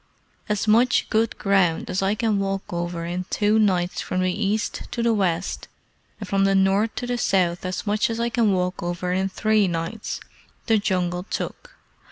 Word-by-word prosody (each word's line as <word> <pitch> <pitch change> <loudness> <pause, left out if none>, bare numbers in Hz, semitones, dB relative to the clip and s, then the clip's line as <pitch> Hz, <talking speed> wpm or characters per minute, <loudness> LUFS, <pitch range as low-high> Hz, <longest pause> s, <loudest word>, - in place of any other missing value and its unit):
"As 210 +1 0
much 235 +4 +3
good 220 +1 +1
ground 190 -5 +2
as 185 - -1
I 195 +2 +1
can 215 -2 +1
walk 195 -2 -3
over 170 -1 -3
in 180 +2 -3
two 210 +1 +2
nights 180 -4 +1
from 185 - -2
the 185 0 +1
east 210 +2 -1
to 235 - -2
the 235 -1 +3
west, 185 -3 -1 0.5
and 205 - -6
from 195 +1 +1
the 195 0 +3
north 195 +3 +2
to 245 - -3
the 245 0 -2
south 180 -5 +1
as 185 - -4
much 210 +2 +1
as 230 0 -3
I 235 0 +1
can 225 -2 +2
walk 180 -1 -1
over 175 +1 -2
in 190 +1 0
three 215 +1 +2
nights, 170 +5 -3 0.5
the 225 -2 +3
Jungle 180 -2 -1
took. - - -5
195 Hz, 190 wpm, -23 LUFS, 180-215 Hz, 0.5 s, much